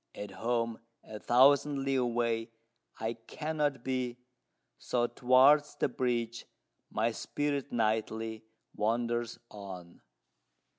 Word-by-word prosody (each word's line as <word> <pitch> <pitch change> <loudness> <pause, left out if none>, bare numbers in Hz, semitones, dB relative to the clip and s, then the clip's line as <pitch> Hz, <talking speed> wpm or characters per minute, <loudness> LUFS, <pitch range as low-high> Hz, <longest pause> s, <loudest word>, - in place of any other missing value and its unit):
At 105 -1 -6
home 115 +1 -1 0.2
a 110 -1 -9
thousand 140 +3 +4
li 135 0 0
away, 120 -2 0 0.5
I 110 +1 -1
cannot 145 +3 -3
be; 125 -2 -2 0.6
So 120 -1 0
towards 130 +5 +4
the - - 0
Bridge 120 -2 -2 0.4
my 115 +2 0
spirit 145 +3 -2
nightly 110 0 -1 0.3
wanders 120 +1 -1
on." 95 -4 -9
120 Hz, 100 wpm, -31 LUFS, 115-130 Hz, 0.6 s, thousand